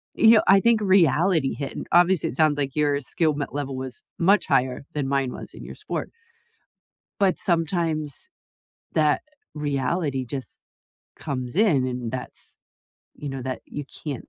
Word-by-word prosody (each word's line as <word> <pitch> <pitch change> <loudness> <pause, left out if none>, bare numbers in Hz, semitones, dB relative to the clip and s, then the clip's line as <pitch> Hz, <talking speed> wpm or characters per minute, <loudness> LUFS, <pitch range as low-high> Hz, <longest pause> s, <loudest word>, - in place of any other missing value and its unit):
you 225 - +6
know, 225 - +7
I 195 0 +7
think 230 0 +3
reality 175 -5 +3
hit, 140 -1 -5
and - - -5
obviously, 175 -1 +4
it - - -9
sounds 155 -1 +3
like 135 -2 -2
your 145 -2 +1
skill 155 +3 0
m 140 - -1
level 140 -2 -3
was 130 -1 -5 0.2
much 195 +4 +4
higher 125 +1 +1
than 145 -3 -2
mine 135 -2 0
was, - - -8
in - - -10
your - - -8
sport - - -5 1.1
but 190 -2 +3
sometimes, 165 - -1 0.6
that 155 -2 +3 0.3
reality 145 -1 -1
just 135 0 -5 0.6
comes 130 -2 -4
in, 170 - +3
and 125 -2 -3
that's 130 -1 -6 0.6
you 145 - -7
know, 135 - -5
that 130 0 -4
you 145 - -6 0.2
can't 145 -5 -5
145 Hz, 160 wpm, -24 LUFS, 135-175 Hz, 1.1 s, know